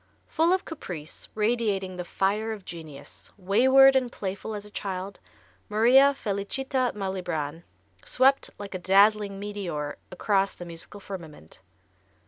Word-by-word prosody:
Full 330 +2 +2
of 375 0 +1
caprice, 175 - -8
radiating 210 -4 0
the 180 - -4
fire 210 +5 -1
of 205 -3 -10
genius, 155 -4 -10
wayward 260 +8 +6
and 255 -2 +1
playful 200 +2 -5
as 205 0 -6
a 210 - -13
child, 195 -1 -5 0.5
Maria 255 +6 +5
Felicità 255 +5 -1
Malibran 175 -6 -3 0.4
swept 270 +2 +3
like 200 -1 -8
a 185 - -3
dazzling 200 +2 +3
meteor 185 -8 -4
across 195 +1 +1
the 175 - -9
musical 170 +4 -8
firmament. 160 - -10
200 Hz, 125 wpm, -26 LUFS, 185-230 Hz, 0.5 s, wayward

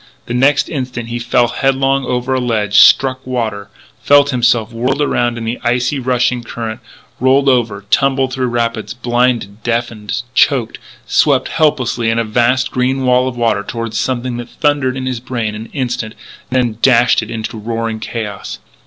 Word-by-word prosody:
The 120 - -5
next 135 +4 +3
instant 125 -5 -5
he 120 +1 -3
fell 120 0 +2
headlong 135 +1 +1
over 125 +1 -1
a 130 - +1
ledge, 110 -4 +1
struck 130 -1 +5
water, 110 -6 -3 0.3
felt 145 +4 +4
himself 120 -2 +1
whirled 125 +5 -1
around 120 -5 0
in 115 - -5
the 115 +2 -3
icy, 125 +3 0
rushing 125 -1 0
current, 115 -1 -6 0.4
rolled 135 +2 +3
over, 115 -6 +1
tumbled 135 -1 +2
through 130 -1 -1
rapids, 115 -1 -2
blinded, 120 -3 0
deafened, 115 -2 -2
choked, 130 -5 +2 0.3
swept - - +2
helplessly 130 -6 +1
in 115 - 0
a 115 - +2
vast 120 +4 +1
green 130 +1 0
wall 125 0 +3
of 125 -2 -5
water 115 -3 +1
toward 115 +2 -5
something 125 +1 -2
that 120 0 -7
thundered 145 -3 0
in 130 - -4
his 130 -2 -2
brain 115 -3 -3
an 110 +2 -7
instant, 120 -5 -4 0.3
then 120 -4 0
dashed 120 -2 +4
it 110 - -7
into 110 0 -5
roaring 115 0 -3
chaos. 105 -4 -5
120 Hz, 165 wpm, -16 LUFS, 115-130 Hz, 0.4 s, struck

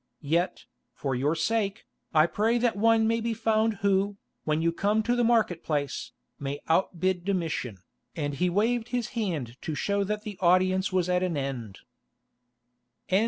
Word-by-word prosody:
Yet, 170 +5 0 0.3
for 135 -2 -2
your 140 +6 +1
sake, 215 +1 -1 0.3
I 155 -1 +5
pray 220 +7 +1
that 240 -2 +1
one 225 +1 +4
may 230 0 +1
be 230 0 -1
found 220 0 +1
who, 200 +1 +2 0.3
when 155 0 +1
you 165 +1 +2
come 205 +5 +1
to 240 +2 +1
the 245 - +2
market 225 -7 +2
place, 145 -3 -2 0.3
may 140 0 -4
outbid 180 +1 +1
Domitian," 165 - -2 0.4
and 145 -3 -2
he 180 +6 +1
waved 225 +5 +1
his 245 -2 -2
hand 160 - -3
to 155 - -3
show 200 +5 0
that 210 +1 -3
the 210 -4 -7
audience 185 +2 +3
was 185 -2 +1
at 180 0 +2
an 180 -4 -1
end. 125 -7 -4
185 Hz, 165 wpm, -27 LUFS, 160-220 Hz, 0.4 s, I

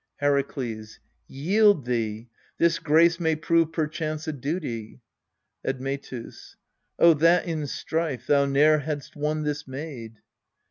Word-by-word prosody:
Herakles. 135 -6 -2 0.3
Yield 195 - +3
thou! 110 -3 -2 0.4
this 170 0 +2
grace 170 +2 +4
may 160 -2 +1
prove 165 +1 +1
perchance 155 -1 -3
a 155 - -2
duty. 135 -6 -4 0.6
Admetus. 135 -2 -5 0.4
Oh, 170 -1 +7
that 165 +3 +3
in 160 -4 -3
strife 150 -4 -3
thou 140 0 +3
ne'er 150 +3 +4
hadst 145 -1 -5
won 150 +1 -1
this 145 -1 -3
maid 130 -5 -7
150 Hz, 120 wpm, -25 LUFS, 135-160 Hz, 0.6 s, Oh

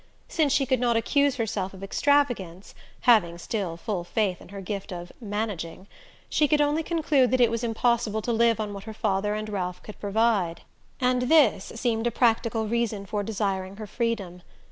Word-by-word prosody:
Since 310 -4 +1
she 275 - +3
could 260 -2 +1
not 240 -2 +2
accuse 280 +4 +2
herself 200 -6 -2
of 190 - -11
extravagance 205 -7 0 0.3
having 185 -8 +4
still 175 -2 -3
full 190 -1 -3
faith 185 0 -1
in - - -14
her 200 0 -8
gift 195 +1 -5
of 175 -1 -7
"managing" 205 -5 -4 0.4
she 300 - +2
could 300 +1 +3
only 295 +2 +2
conclude 305 -6 +2
that 255 - +1
it 240 -2 +5
was 230 +1 -2
impossible 225 -2 0
to 240 - 0
live 230 -1 +3
on 210 -1 -3
what 200 0 -8
her 220 -1 -7
father 205 +1 0
and 215 0 -4
Ralph 180 -4 -4
could 210 - -11
provide; 205 -5 +1 0.4
and 250 -1 +1
this 295 -11 +5
seemed 230 -1 0
a - - 0
practical 230 -1 +1
reason 225 -3 -1
for 205 +2 -2
desiring 195 -2 -2
her 215 +1 -7
freedom. 205 -5 -3
220 Hz, 185 wpm, -26 LUFS, 195-240 Hz, 0.4 s, it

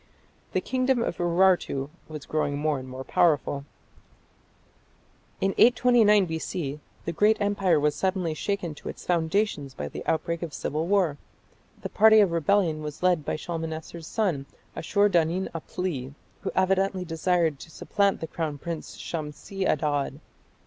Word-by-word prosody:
The - - +1
kingdom 255 -2 +1
of - - -3
Urartu 175 -5 +2 0.2
was 155 -2 -8
growing 145 -2 -1
more 150 -1 0
and 130 0 -9
more 130 +1 -6
powerful. 145 -3 +1 1.7
In 195 0 +1
829 230 -4 +5
B.C. 160 -3 -4 0.3
the - - -1
great 210 +6 +3
empire 200 -5 +2
was 150 0 +2
suddenly 185 -3 -1
shaken 180 0 -2
to 150 - -8
its - - -9
foundations 165 -4 0
by 75 - -4
the - - -7
outbreak 170 +1 0
of 165 -4 -5
civil 155 +3 -2
war. 180 -7 +2 0.6
The - - -3
party 220 +1 +6
of 200 -4 +4
rebellion 165 -1 +2
was 150 +2 -7
led 180 -4 +3
by - - -2
Shalmaneser's 160 0 -5
son 175 -12 -1 0.3
Ashur 200 +5 +2
danin 175 0 +1
apli, 155 -5 -4 0.3
who 195 - -2
evidently 190 0 +1
desired 165 -2 +1
to - - -11
supplant 200 +4 0
the 160 - -3
crown 155 -2 -3
prince 165 +2 -6
Shamshi 165 +5 -4
Adad. 145 -1 0
170 Hz, 145 wpm, -26 LUFS, 150-195 Hz, 1.7 s, party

